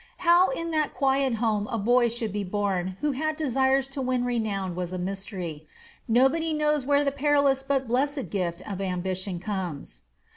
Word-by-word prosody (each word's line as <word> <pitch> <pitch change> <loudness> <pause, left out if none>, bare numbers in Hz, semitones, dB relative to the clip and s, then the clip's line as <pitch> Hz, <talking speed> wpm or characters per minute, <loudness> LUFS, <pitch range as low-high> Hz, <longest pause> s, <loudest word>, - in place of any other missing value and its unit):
How 345 +2 +6
in 335 -9 -3
that 310 -2 0
quiet 270 -2 +2
home 215 -2 0
a 230 - -2
boy 240 +3 +3
should 225 -3 -3
be 205 -1 -2
born 190 -2 -2
who 295 - +1
had 310 +3 -2
desires 270 -2 +2
to 275 0 -5
win 255 -1 0
renown 210 -6 -1
was 180 0 -4
a - - -2
mystery. 180 -4 -5 0.4
Nobody 270 +8 +3
knows 300 -3 +1
whence 285 0 +3
the 280 - +2
perilous 280 -1 +2
but 270 -1 -1
blessed 275 +3 -1
gift 180 -2 -3
of 195 -2 -4
ambition 185 0 -2
comes. 180 -6 -5
240 Hz, 175 wpm, -26 LUFS, 195-280 Hz, 0.4 s, How